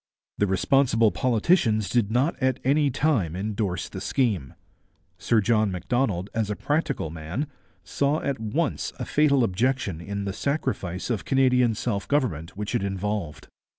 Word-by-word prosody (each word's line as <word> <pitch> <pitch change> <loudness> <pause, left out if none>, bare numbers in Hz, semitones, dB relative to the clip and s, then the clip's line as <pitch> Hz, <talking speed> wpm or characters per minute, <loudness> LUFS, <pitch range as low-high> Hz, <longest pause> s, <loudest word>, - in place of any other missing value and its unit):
The 105 - +3
responsible 115 +2 +3
politicians 115 - +2
did 110 0 +1
not 130 +8 +2
at 130 -1 +1
any 145 +2 +3
time 125 - +1
endorse 100 -2 -2
the - - -8
scheme. 105 - -1 0.6
Sir 110 +2 +2
John 110 -1 +2
Macdonald, 100 -1 -1
as 110 -2 -1
a 105 - -1
practical 145 - -1
man, 85 - -4 0.4
saw 145 +2 0
at 140 -4 -1
once 135 +8 -1
a - - -4
fatal 140 -3 +3
objection 110 -4 0
in 100 +2 -4
the 100 - -3
sacrifice 115 - -2
of 110 - -1
Canadian 125 -3 +3
self 100 -4 -2
government 95 - -1
which 105 0 -4
it - - +1
involved. 95 -7 -3
110 Hz, 150 wpm, -25 LUFS, 95-135 Hz, 0.6 s, The